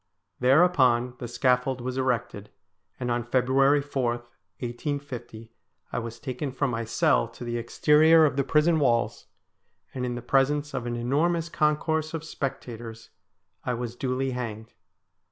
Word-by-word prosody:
Thereupon 130 Hz, -4 st, +4 dB
the 120 Hz, -, -5 dB
scaffold 125 Hz, +2 st, +1 dB
was 125 Hz, +1 st, -4 dB
erected, 120 Hz, -5 st, -2 dB, 0.5 s
and 125 Hz, -1 st, -2 dB
on 120 Hz, 0 st, 0 dB
February 135 Hz, +4 st, +3 dB
4, 130 Hz, -4 st, -1 dB
1850, 120 Hz, -1 st, -7 dB, 0.4 s
I -, -, 0 dB
was 115 Hz, 0 st, -7 dB
taken 130 Hz, +3 st, -4 dB
from 135 Hz, 0 st, -1 dB
my 115 Hz, 0 st, -2 dB
cell 110 Hz, -, +2 dB
to -, -, -11 dB
the 120 Hz, 0 st, -2 dB
exterior 155 Hz, +6 st, +5 dB
of 140 Hz, -, 0 dB
the 140 Hz, -, +1 dB
prison 155 Hz, +3 st, +3 dB
walls, 120 Hz, -5 st, +1 dB, 0.7 s
and 125 Hz, -, -4 dB
in 125 Hz, -1 st, -2 dB
the 120 Hz, -, -6 dB
presence 145 Hz, +3 st, +1 dB
of 120 Hz, -, -3 dB
an 120 Hz, -, -2 dB
enormous 160 Hz, +8 st, 0 dB
concourse 155 Hz, +1 st, 0 dB
of 160 Hz, -, -5 dB
spectators 120 Hz, -7 st, -6 dB, 0.5 s
I 125 Hz, -, -1 dB
was 120 Hz, 0 st, -5 dB
duly 130 Hz, +1 st, -1 dB
hanged. 110 Hz, -3 st, -6 dB
125 Hz, 145 wpm, -26 LUFS, 120-145 Hz, 0.7 s, exterior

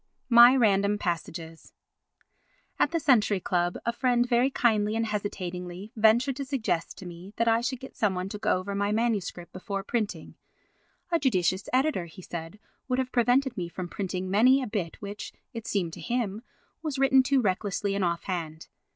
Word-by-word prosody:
My 240 Hz, +1 st, +8 dB
Random 205 Hz, -4 st, +3 dB
Passages 165 Hz, -3 st, -5 dB, 1.1 s
At -, -, +4 dB
the 335 Hz, -, 0 dB
Century 220 Hz, -9 st, +3 dB
Club 175 Hz, -1 st, 0 dB
a 235 Hz, -, 0 dB
friend 245 Hz, -1 st, +2 dB
very 245 Hz, +2 st, +3 dB
kindly 220 Hz, -5 st, +1 dB
and 225 Hz, 0 st, 0 dB
hesitatingly 185 Hz, -2 st, -5 dB
ventured 235 Hz, +5 st, +3 dB
to 280 Hz, -, -3 dB
suggest 230 Hz, -11 st, -2 dB
to 190 Hz, -, -10 dB
me 175 Hz, +3 st, -10 dB
that 230 Hz, -, +1 dB
I 230 Hz, 0 st, +4 dB
should 250 Hz, +1 st, -2 dB
get 265 Hz, -, -11 dB
some 205 Hz, -4 st, +1 dB
one 180 Hz, +1 st, -3 dB
to 210 Hz, -, -6 dB
go 210 Hz, -3 st, +2 dB
over 190 Hz, +2 st, -5 dB
my 200 Hz, +1 st, 0 dB
MS. 220 Hz, -3 st, 0 dB, 0.2 s
before 195 Hz, +1 st, -4 dB
printing; 215 Hz, 0 st, -3 dB, 0.8 s
a 335 Hz, -, +3 dB
judicious 190 Hz, -, +1 dB
editor, 260 Hz, -, +1 dB
he 170 Hz, +2 st, -13 dB
said, 165 Hz, +3 st, -7 dB, 0.3 s
would 255 Hz, -1 st, 0 dB
have 260 Hz, -1 st, -1 dB
prevented 250 Hz, +2 st, +2 dB
me 175 Hz, -5 st, -4 dB
from 180 Hz, +1 st, -6 dB
printing 185 Hz, -1 st, -3 dB
many 250 Hz, +8 st, +4 dB
a -, -, -4 dB
bit 200 Hz, -6 st, -4 dB
which, 205 Hz, +1 st, -7 dB, 0.2 s
it 230 Hz, -1 st, -7 dB
seemed 175 Hz, -5 st, -1 dB
to -, -, -8 dB
him, 230 Hz, -4 st, -2 dB, 0.4 s
was 305 Hz, -4 st, -3 dB
written 265 Hz, 0 st, +5 dB
too 275 Hz, +1 st, +2 dB
recklessly 200 Hz, -1 st, -1 dB
and 200 Hz, -1 st, 0 dB
offhand. 170 Hz, -2 st, -3 dB
210 Hz, 175 wpm, -27 LUFS, 185-245 Hz, 1.1 s, My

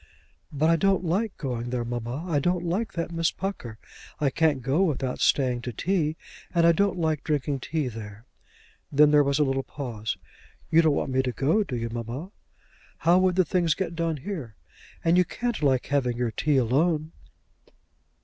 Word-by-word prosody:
"But 155 Hz, +3 st, +2 dB
I 165 Hz, -, +4 dB
don't 195 Hz, +1 st, +2 dB
like 195 Hz, +5 st, -1 dB
going 120 Hz, -4 st, -3 dB
there, 120 Hz, -1 st, -2 dB
mamma. 120 Hz, +6 st, -4 dB
I 155 Hz, -5 st, +1 dB
don't 175 Hz, +3 st, 0 dB
like 190 Hz, +7 st, -1 dB
that 170 Hz, 0 st, -3 dB
Miss 165 Hz, -1 st, +1 dB
Pucker. 170 Hz, -, -5 dB, 0.4 s
I 140 Hz, -3 st, +1 dB
can't 150 Hz, -5 st, +1 dB
go 135 Hz, +7 st, +1 dB
without 135 Hz, -8 st, 0 dB
staying 125 Hz, -3 st, +2 dB
to 125 Hz, -, -4 dB
tea, 160 Hz, -, 0 dB, 0.4 s
and 170 Hz, -1 st, +4 dB
I 170 Hz, -, +7 dB
don't 195 Hz, +2 st, +1 dB
like 160 Hz, -3 st, 0 dB
drinking 145 Hz, -2 st, -1 dB
tea 150 Hz, +1 st, -2 dB
there." 110 Hz, -1 st, -8 dB, 0.7 s
Then 150 Hz, +1 st, +5 dB
there 150 Hz, -1 st, +6 dB
was 140 Hz, 0 st, +1 dB
a 150 Hz, -, +4 dB
little 135 Hz, -1 st, 0 dB
pause. 120 Hz, -6 st, -5 dB, 0.5 s
"You 165 Hz, -, +6 dB
don't 155 Hz, -3 st, +3 dB
want 135 Hz, -, -2 dB
me 130 Hz, 0 st, +2 dB
to 130 Hz, -1 st, -2 dB
go; 155 Hz, -, +2 dB
do 145 Hz, -10 st, -5 dB
you, 115 Hz, -1 st, -3 dB
mamma? 120 Hz, -, -5 dB, 0.7 s
How 170 Hz, +2 st, +4 dB
would 185 Hz, -1 st, +2 dB
the 185 Hz, -1 st, +3 dB
things 170 Hz, -1 st, +1 dB
get 175 Hz, -3 st, -3 dB
done 165 Hz, -2 st, -1 dB
here? 140 Hz, -, -6 dB, 0.5 s
and 165 Hz, +1 st, +4 dB
you -, -, +6 dB
can't 240 Hz, +4 st, -3 dB
like 135 Hz, -4 st, +2 dB
having 125 Hz, -4 st, 0 dB
your 120 Hz, -2 st, -1 dB
tea 145 Hz, +4 st, +1 dB
alone." 155 Hz, +6 st, +1 dB
150 Hz, 190 wpm, -26 LUFS, 125-170 Hz, 0.7 s, I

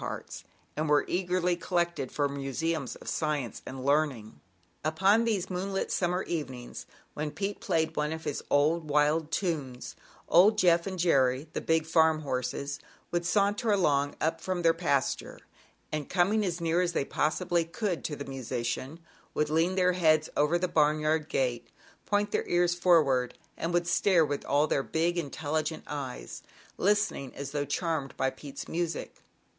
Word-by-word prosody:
parts, -, -, -6 dB, 0.3 s
and 155 Hz, 0 st, -1 dB
were 145 Hz, -1 st, +4 dB
eagerly 180 Hz, 0 st, 0 dB
collected 170 Hz, -5 st, -1 dB
for 145 Hz, -1 st, +1 dB
museums 140 Hz, +1 st, -3 dB
of -, -, -14 dB
science 150 Hz, -7 st, -2 dB
and 130 Hz, 0 st, -6 dB
learning. 140 Hz, -, 0 dB, 0.4 s
Upon 190 Hz, +9 st, +3 dB
these 210 Hz, -6 st, 0 dB
moonlit 195 Hz, +2 st, -2 dB
summer 180 Hz, +1 st, 0 dB
evenings, 130 Hz, -7 st, -5 dB, 0.3 s
when 150 Hz, 0 st, -3 dB
Pete 195 Hz, +6 st, -4 dB
played 160 Hz, 0 st, 0 dB
one 150 Hz, 0 st, 0 dB
of 160 Hz, 0 st, -5 dB
his 145 Hz, -, -3 dB
odd, 155 Hz, +3 st, +2 dB
wild 150 Hz, +1 st, +2 dB
tunes, 155 Hz, -8 st, -3 dB, 0.3 s
old 205 Hz, +5 st, +6 dB
Jeff 175 Hz, -2 st, +4 dB
and 190 Hz, -1 st, -4 dB
Jerry, 135 Hz, -5 st, +2 dB
the -, -, -2 dB
big 160 Hz, -1 st, +1 dB
farm 160 Hz, -1 st, +3 dB
horses, 140 Hz, +1 st, -3 dB, 0.3 s
would 175 Hz, 0 st, 0 dB
saunter 205 Hz, +4 st, +2 dB
along 145 Hz, -8 st, +2 dB
up 165 Hz, +1 st, -1 dB
from 185 Hz, -2 st, -2 dB
their 165 Hz, 0 st, +5 dB
pasture, 155 Hz, -5 st, -1 dB, 0.5 s
and, 155 Hz, -2 st, -3 dB
coming 195 Hz, +4 st, +2 dB
as 180 Hz, -3 st, -2 dB
near 170 Hz, +1 st, +1 dB
as 175 Hz, -1 st, 0 dB
they 140 Hz, -, 0 dB
possibly 170 Hz, +4 st, 0 dB
could 180 Hz, +2 st, -3 dB
to 150 Hz, -, -2 dB
the 140 Hz, -, -7 dB
musician, 130 Hz, +2 st, -4 dB, 0.4 s
would 150 Hz, 0 st, 0 dB
lean 165 Hz, +4 st, +2 dB
their 180 Hz, -1 st, +3 dB
heads 155 Hz, -3 st, +3 dB
over 150 Hz, +4 st, +3 dB
the 180 Hz, +1 st, 0 dB
barnyard 155 Hz, 0 st, +2 dB
gate, 125 Hz, -3 st, -1 dB, 0.4 s
point 205 Hz, 0 st, +1 dB
their -, -, -1 dB
ears 175 Hz, 0 st, +2 dB
forward 155 Hz, -8 st, +3 dB, 0.2 s
and 165 Hz, -, -3 dB
would 175 Hz, 0 st, +1 dB
stare 175 Hz, -1 st, +3 dB
with 145 Hz, -1 st, -3 dB
all 145 Hz, +2 st, +3 dB
their 145 Hz, -, +1 dB
big, 165 Hz, +5 st, 0 dB
intelligent 155 Hz, +1 st, -3 dB
eyes, 130 Hz, -, -6 dB, 0.4 s
listen 205 Hz, +2 st, +2 dB
ing 135 Hz, -2 st, -8 dB
as 140 Hz, -1 st, -6 dB
though 145 Hz, -1 st, -1 dB
charmed 150 Hz, -1 st, -2 dB
by 130 Hz, -, +1 dB
Pete's 145 Hz, -2 st, -9 dB
music. 170 Hz, 0 st, -3 dB
160 Hz, 160 wpm, -29 LUFS, 145-175 Hz, 0.5 s, old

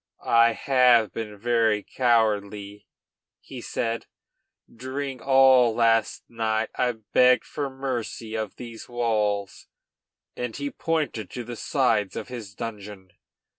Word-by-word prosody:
"I 115 Hz, 0 st, +5 dB
have 125 Hz, -4 st, +3 dB
been 105 Hz, -2 st, -6 dB
very 110 Hz, -1 st, +1 dB
cowardly," 105 Hz, -4 st, 0 dB, 0.5 s
he -, -, -10 dB
said. 115 Hz, 0 st, -3 dB, 0.7 s
"During 130 Hz, +2 st, -5 dB
all 130 Hz, -3 st, +5 dB
last 115 Hz, -1 st, +2 dB
night 110 Hz, -1 st, -1 dB
I 125 Hz, -1 st, +1 dB
begged 125 Hz, +3 st, +3 dB
for 145 Hz, -2 st, -4 dB
mercy 125 Hz, -4 st, -5 dB
of 110 Hz, -2 st, -4 dB
these 115 Hz, -2 st, -10 dB
walls," 105 Hz, -5 st, -1 dB, 0.7 s
and 125 Hz, -2 st, -4 dB
he 140 Hz, 0 st, -4 dB
pointed 155 Hz, -, -2 dB
to 125 Hz, -, -6 dB
the 120 Hz, +1 st, -7 dB
sides 115 Hz, -6 st, 0 dB
of -, -, -6 dB
his 110 Hz, -5 st, -8 dB
dungeon. 105 Hz, -5 st, -8 dB
115 Hz, 120 wpm, -25 LUFS, 110-125 Hz, 0.7 s, I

